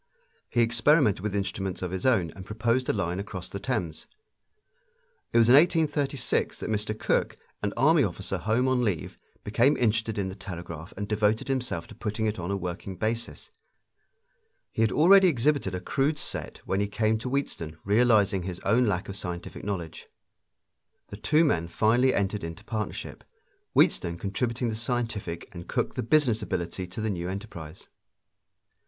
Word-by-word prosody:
He 120 - +2
experimented 115 - +4
with 105 +1 -3
instruments 95 -2 -2
of 90 - -3
his 95 +5 -1
own 95 -11 +2
and 95 - -10
proposed 115 +5 0
a - - +3
line 90 -3 -1
across 100 -3 -6
the 100 - -4
Thames. 95 -10 -3 1.2
It - - +2
was 115 -1 +6
in 120 - +7
1836 145 -3 +2
that - - -4
Mr. 110 0 -1
Cooke, - - 0 0.2
an 100 - -1
army 150 +4 +5
officer 95 -1 -3
home 110 +8 +1
on 130 -1 +2
leave, 95 -9 -2 0.2
became 120 +7 +3
interested 110 -1 +1
in 100 -2 0
the 95 - -5
telegraph 85 -4 -7
and 100 +1 -3
devoted 105 +3 +1
himself 125 -10 -1
to - - -13
putting 110 0 -3
it 105 -2 -1
on 85 +1 -4
a 100 - 0
working 90 +1 -5
basis. 110 +5 -3 1.2
He - - -2
had 110 -3 +3
already 185 - +7
exhibited 140 - +1
a - - -2
crude 140 +10 0
set - - -4
when 95 - 0
he 100 - +1
came 110 +1 +1
to 125 - -4
Wheatstone, 85 - -3
realizing 105 -2 +4
his 90 0 -5
own 115 +5 +3
lack 95 -3 -1
of 100 - -6
scientific 90 -3 -6
knowledge. 90 -6 -5 1.0
The 100 - -8
two 155 +9 +3
men 85 - +1
finally 120 +8 +3
entered 100 -2 -1
into 85 +5 -7
partnership, 110 -2 -5 0.5
Wheatstone 85 0 +3
contributing 115 +5 -1
the 110 - -2
scientific 115 -7 -3
and 85 -1 -9
Cooke - - -1
the - - -2
business 120 -2 +3
ability 85 +1 -3
to 90 +5 -6
the 110 -1 0
new 90 -1 -3
enterprise. 95 -5 -8
105 Hz, 170 wpm, -27 LUFS, 95-120 Hz, 1.2 s, in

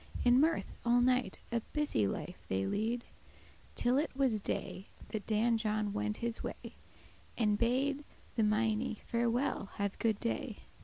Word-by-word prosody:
In 245 +1 +7
mirth 320 +3 +2
all 240 +1 +4
night 250 -5 +2
a 235 - +2
busy 295 - +2
life - - -5
they 95 0 0
lead, 225 - 0 0.7
Till 250 +3 +3
it 310 - 0
was 260 -6 +2
day, 195 -1 -3 0.2
that 215 -2 -4
Dan 225 +1 +3
John 215 -2 0
went 105 0 -1
his 235 -1 -2
way, - - -6 0.6
And 210 -3 +3
bade 265 +6 +1 0.3
the 225 - +2
meinie* 215 +1 +1
"Farewell; 235 -2 0
have 200 -1 -2
good 220 -3 +2
day." 235 -1 -2
230 Hz, 150 wpm, -34 LUFS, 210-250 Hz, 0.7 s, In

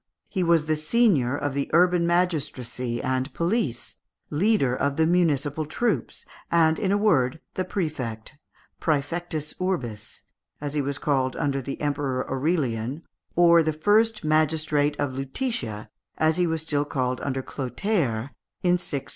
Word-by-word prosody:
He 190 - -1
was 170 -3 +3
the 155 0 +1
senior 155 - +2
of 145 -1 -2
the 140 0 -2
urban 175 0 +4
magistracy 145 -9 -1
and 130 +1 -1
police, 170 - -1 0.3
leader 150 - +2
of 140 +2 0
the 160 - +4
municipal 155 -3 +1
troops, 200 - -1 0.2
and, 160 -1 +3
in 195 -2 0
a 200 - +3
word, 160 -9 +2
the 185 - -1
prefect 150 - -4 0.5
(præfectus 155 +1 -1
urbis), 130 - -3 0.4
as 145 -1 -4
he 150 - +1
was 140 0 -2
called 135 -3 0
under 140 -1 -1
the 135 +2 -6
Emperor 140 -3 -1
Aurelian, 135 -2 -1 0.3
or 170 -1 +6
the 160 -1 0
first 215 +7 +2
magistrate 155 -1 +1
of 135 -2 -1
Lutetia, 135 - -3 0.3
as 160 +1 +2
he 180 -1 +2
was 160 -1 -1
still 145 -3 0
called 130 -3 -2
under 135 -1 -2
Clotaire 135 - -2 0.3
in 180 0 +3
663. 140 -6 -4
150 Hz, 145 wpm, -25 LUFS, 135-175 Hz, 0.5 s, or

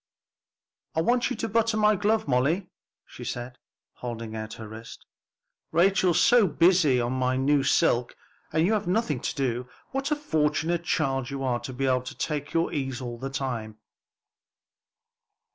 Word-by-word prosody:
"I 160 - +2
want 240 +8 +2
you 255 - -2
to 225 - -3
button 225 0 +1
my 210 0 +4
glove, 210 0 +1
Molly," 140 +9 +1 0.3
she - - -11
said, 120 +1 -5 0.4
holding 115 -2 -6
out 110 0 -5
her 110 - -8
wrist, 110 +2 -11 0.7
"Rachel's 180 0 +3
so 240 -5 +5
busy 165 -5 +4
on 120 +1 -1
my 130 0 0
new 140 +2 +3
silk, 125 -2 +2 0.4
and 160 +1 +2
you 210 - +2
have 210 -3 -1
nothing 180 - 0
to - - -3
do. 125 -2 -2 0.2
What 270 +1 -2
a 300 - +2
fortunate 165 - 0
child 135 -6 0
you 140 -1 -4
are 125 -2 0
to 130 - -7
be 135 +2 -2
able 130 -1 +2
to 125 - -9
take 145 -2 -3
your 165 0 0
ease 135 -4 -2
all 120 -2 -6
the 135 +2 -4
time." 120 -6 -4
140 Hz, 165 wpm, -26 LUFS, 125-180 Hz, 0.7 s, so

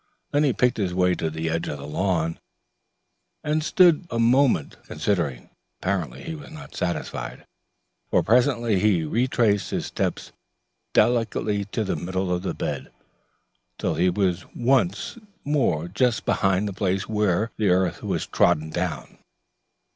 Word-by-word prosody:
Then 145 +1 +3
he 140 - +3
picked 125 +1 +1
his 95 -4 -1
way 90 0 +3
to 80 -2 -2
the 80 +1 -4
edge 80 +1 -1
of 75 - -4
the 70 - -8
lawn, 80 +1 -1 1.0
and 155 +1 0
stood 175 +1 +4
a 115 - -3
moment 120 - +3
considering. 80 -12 -2 0.3
Apparently 90 -4 -2
he 165 - -5
was 155 -2 -9
not 155 -1 -11
satisfied, 85 -3 -4 0.6
for - - +3
presently 120 -2 +3
he 95 -4 +3
retraced 115 +2 +1
his - - -2
steps - - -3 0.6
delicately 110 -3 +2
to 105 +2 -2
the 95 - -1
middle 95 +1 -2
of 90 - -1
the 95 - -3
bed, - - -4 0.9
till - - -1
he 90 +4 +2
was 95 -1 0
once 120 - +1 0.3
more 120 - +1
just 115 +6 0
behind 95 +1 +2
the 100 - -4
place 95 0 -1
where 105 0 +1
the 105 -3 +2
earth 90 -1 +1
was - - -2
trodden 80 +1 +2
down. 90 -1 -4
100 Hz, 145 wpm, -24 LUFS, 90-120 Hz, 1.0 s, stood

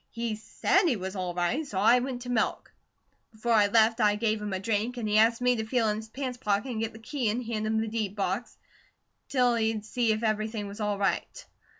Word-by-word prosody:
He 230 -1 -3
SAID 220 - +1
he 275 - +2
was 190 -1 -5
all 180 -2 -3
right, 180 - 0
so 240 -10 -6
I 230 +6 +5
went 245 -1 -4
to 250 - -7
milk. 230 - -1 0.6
Before 225 +2 -3
I 210 -2 +5
left 225 +2 +3
I 210 -1 +4
gave 215 0 0
him 210 -1 -4
a 190 - -2
drink, 225 +4 -1
an' 235 - -3
he 210 0 +3
asked 230 +2 +4
me 250 0 +3
to 220 - -1
feel 225 0 +1
in 210 - -1
his 220 0 -8
pants 255 0 -5
pocket 210 +3 0
an' 230 -3 -3
get 225 0 -2
the - - -10
key 235 +1 -2
an' 220 +4 -1
hand 220 -2 -3
him 220 0 +1
the 225 - -1
deed 215 -3 -3
box, 200 +3 -2 0.7
till 250 -3 +3
he'd 220 -2 0
see 230 +1 +1
if 215 +1 -1
everything 215 0 -1
was 200 +2 -9
right. 205 -2 -1
220 Hz, 235 wpm, -28 LUFS, 210-235 Hz, 0.7 s, I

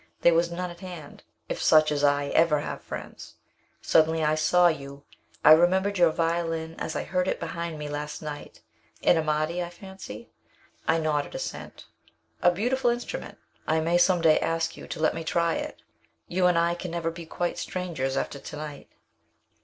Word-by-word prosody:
There 170 - +6
was 170 +1 +2
none 180 +1 -4
at 170 - -12
hand 180 -5 -9 0.3
if - - -4
such 155 -1 +5
as 145 -1 -1
I 145 0 +2
ever 155 -3 +3
have - - -5
friends. - - -9 0.5
Suddenly 160 0 +3
I 150 0 +3
saw 155 +3 +3
you. 140 -3 -4 0.4
I 150 - +9
remembered 190 +4 +4
your 175 -2 +6
violin 165 0 -1
as 160 - -4
I - - -1
heard 180 +2 -1
it - - -1
behind 170 -1 -4
me 150 0 -5
last 150 0 -5
night 150 -2 -8 0.4
an - - +5
Amati, 155 +2 0
I 175 - -3
fancy?" 190 +5 -10 0.6
I 160 - +3
nodded 155 -2 -1
assent. - - -6 0.6
"A 180 - +6
beautiful 240 +8 +1
instrument. 240 - -4 0.3
I 160 +1 +2
may 170 +2 +2
some 175 0 +4
day 160 -2 +5
ask 165 0 -1
you - - -10
to - - -6
let 155 - +2
me 165 - -5
try 170 +1 +1
it - - -5 0.4
you 180 +1 +2
and 175 -1 +3
I 170 0 +2
can 175 +1 -6
never 165 0 -2
be 165 0 -9
quite 175 +1 -2
strangers 155 -8 -3
after 140 - -3
to - - -9
night." 150 -1 -8
165 Hz, 185 wpm, -26 LUFS, 155-175 Hz, 0.6 s, I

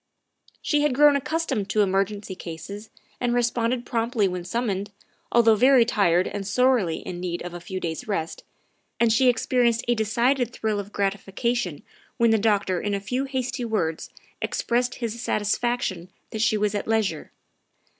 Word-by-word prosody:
She 295 -1 +2
had 295 -4 +1
grown 295 +1 +6
accustomed 280 -8 -1
to 215 - +3
emergency 195 +1 -1
cases 185 +5 -8 0.3
and 245 -1 0
had - - +1
responded 240 0 0
promptly 230 -3 0
when 180 -1 -4
summoned, 205 0 -2 0.4
although 230 -1 +5
very 250 +2 +5
tired 185 -6 +2
and 195 -1 -5
sorely 235 -6 +2
in 175 - -6
need 175 -1 -3
of 175 0 -7
a 175 - -6
few 185 +2 -5
days' 165 +1 -4
rest, 165 -6 -3 0.6
and 230 -2 +4
she 255 +3 +4
experienced 240 -1 +1
a 240 - +4
decided 240 +3 +1
thrill 215 -3 -2
of 205 0 -7
gratification 200 -2 -2 0.3
when 235 -2 +4
the 220 - +3
doctor 200 -4 +1
in 205 -1 -1
a - - -2
few 250 +7 -2
hasty 260 -2 -3
words 190 -9 -2 0.3
expressed 245 +1 0
his 235 -1 -4
satisfaction 210 -5 -1 0.2
that 220 - -3
she 220 -1 +3
was 210 0 0
at 205 - -3
leisure. 215 -8 -1
220 Hz, 165 wpm, -24 LUFS, 195-240 Hz, 0.6 s, grown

